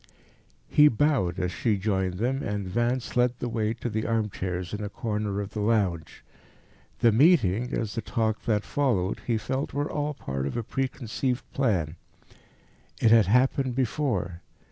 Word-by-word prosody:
He 150 0 +6
bowed, 125 - +1
as 90 -1 -1
she 105 +5 0
joined 95 -2 -1
them, 125 +7 -1
and 100 -1 -3
Vance 120 +6 -1
led 125 0 +2
the 125 - -3
way 110 -1 -1
to 115 - -5
the 110 -1 -2
armchairs 95 -5 -2
in 105 0 -3
a 105 - -3
corner 105 -2 -2
of 100 0 -4
the 110 - -5
lounge. 100 -7 0 0.8
The 115 - +6
meeting, 125 - +4
as 110 -3 -2
the 115 - -2
talk 110 -1 -1
that 105 -2 +1
followed, 115 -10 0
he 115 -2 +2
felt, 130 +6 -3
were 145 +2 -1
all 150 0 -2
part 70 - -3
of 70 - -4
a 120 - -1
preconceived 130 0 -2
plan. 90 - 0 1.0
It 110 - +4
had 115 -4 +6
happened 130 +3 +2
before. 115 - -1
110 Hz, 165 wpm, -27 LUFS, 100-125 Hz, 1.0 s, He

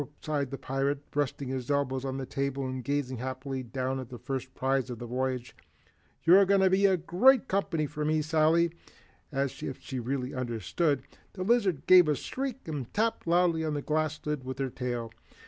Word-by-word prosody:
sighed 145 -4 -2
the 135 - -5
pirate, 135 +2 -1 0.2
resting 140 -2 -1
his 130 -1 -4
elbows 135 -2 0
on 135 -1 -3
the 135 - -4
table 140 0 -2
and 130 -1 -4
gazing 140 -1 -1
happily 130 +2 -4
down 130 +2 -3
at 130 -2 -7
the 125 - -7
first 130 0 -4
prize 135 -1 0
of 120 - -5
the 120 - -7
voyage. 125 0 -2 0.7
"You're 185 +4 +7
going 200 0 +4
to 190 -1 +4
be 195 +1 +5
great 220 +10 +4
company 180 -5 0
for 150 +1 -4
me, 155 0 +1
Sally." 160 +2 +3 0.6
As 135 -2 -2
if 135 - -5
she 130 -2 -5
really 125 +2 -3
understood, 125 - -1 0.3
the 185 - -4
lizard 200 - +2
gave 180 -3 +8
a 150 - +2
squeak 265 - -5
and 145 -6 -4
tapped 220 -3 0
loudly 170 -1 +3
on 155 -2 -1
the 145 - -3
glass 155 0 0
lid 150 -3 -2
with 130 0 -5
her 135 -1 -2
tail. 120 -3 -3
140 Hz, 190 wpm, -29 LUFS, 130-160 Hz, 0.7 s, gave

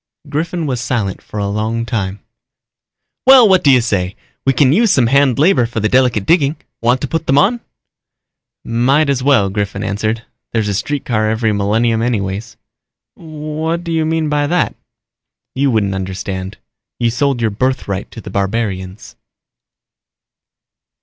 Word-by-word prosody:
Griffin 165 +3 -2
was 130 -5 -2
silent 110 -5 -2
for - - -10
a 100 -1 -1
long 110 +3 -2
time. 100 -4 -3 1.1
"Well, 260 -4 +8
what 190 -2 +4
do 145 - +4
you 130 -2 +6
say? 95 -5 -1 0.3
We - - +6
can 135 0 +4
use 220 +3 +3
some 130 -9 +3
hand 135 +1 +3
labor 145 -6 +3
for 115 -1 -4
the 110 - +1
delicate 125 -4 +2
digging. 155 -3 +3 0.3
Want 120 +2 +2
to 140 - -2
put 165 +3 -3
them 135 - +3
on?" 215 +10 +3 1.1
"Might 135 +6 +2
as 135 -2 -1
well." 125 -8 +3
Griffin 100 0 -3
answered. 110 +2 -2 0.3
"There's 110 -2 0
a - - -1
streetcar 110 -1 -1
every 110 0 0
millennium 110 +3 +1
anyway." 100 -5 -1 0.7
"What 155 +1 -4
do 170 - -5
you 160 -1 +1
mean 160 -1 0
by 145 -1 0
that?" 175 +3 +1 0.8
"You 140 +1 +1
wouldn't 105 -5 +1
understand. 95 0 -5 0.4
You 115 -1 +1
sold 135 +1 0
your 115 -2 0
birthright 100 -4 -2
to 115 - -10
the 100 - -9
barbarians." 95 -1 -3
120 Hz, 155 wpm, -16 LUFS, 105-145 Hz, 1.1 s, Well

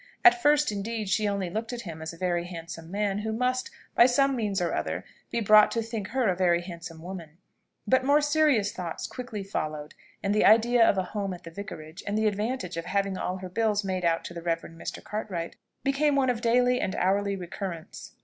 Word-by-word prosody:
At 360 0 +8
first, 295 -4 +4
indeed, 210 +1 -3
she 210 +2 +2
only 200 -3 -1
looked 225 +5 -3
at 240 - -4
him 165 -5 -8
as 160 - -4
a 165 - -12
very 175 -1 0
handsome 165 -1 -8
man, 200 +1 -1
who 220 +1 -2
must, 250 +3 0 0.2
by 235 - +7
some 275 +2 +3
means 210 -5 -1
or 175 - 0
other, - - -2 0.2
be 235 - -1
brought 215 0 +7
to 230 - 0
think 220 -3 -4
her 250 +1 0
a 185 - +2
very 175 -1 +3
handsome 170 -2 -9
woman: 170 -4 -8 0.5
but 260 +5 +3
more 285 +2 +5
serious 295 -8 +3
thoughts 175 -3 -5
quickly 240 -5 -6
followed, 155 -5 -4 0.3
and 200 0 +1
the 210 - +3
idea 235 +2 +6
of 200 - +4
a 190 - +2
home 200 -3 -2
at 175 - -14
the 165 - -9
Vicarage, 165 -3 -8
and 205 +1 0
the 220 - +1
advantage 210 -3 -1
of 165 - -3
having 195 0 0
all 185 0 -2
her 185 -1 -7
bills 210 +1 +1
made 185 -2 -2
out 165 -1 +1
to - - -6
the 170 - -6
Rev. 165 -1 0
Mr. 165 0 -8
Cartwright, 190 -6 -4 0.3
became 280 +1 +2
one 265 -2 +3
of 235 -2 -4
daily 250 +1 +3
and 190 - -1
hourly 200 +2 +1
recurrence. 175 -2 -7
200 Hz, 215 wpm, -27 LUFS, 175-230 Hz, 0.5 s, At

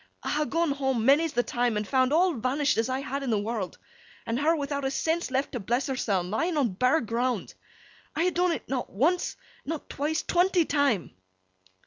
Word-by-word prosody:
I - - -2
ha' 300 0 0
gone 330 -2 +1
home, 265 -5 0
many's 290 +4 +4
the 245 - +2
time, 240 -3 0
and 210 -1 -2
found 260 0 +2
all 350 +3 +4
vanished 275 +4 +1
as 230 - 0
I 260 +1 -1
had 275 0 -3
in 270 - -3
the 220 - +2
world, 205 -2 -3 0.5
and 230 +2 -1
her 320 +3 +3
without 285 -2 -3
a 270 - +1
sense 320 +4 -1
left 265 +2 -1
to 245 - -3
bless 240 +7 -1
herseln 195 -9 -1
lying 320 +10 0
on 270 -5 +2
bare 255 +11 +2
ground. 240 +2 -2 0.6
I 330 - +1
ha' - - +2
dun 360 +1 +2
't - - -16
not 255 -2 -2
once, 320 - +1 0.3
not 315 0 -5
twice—twenty 345 +4 +1
time! 280 - +1
270 Hz, 195 wpm, -27 LUFS, 240-315 Hz, 0.6 s, many's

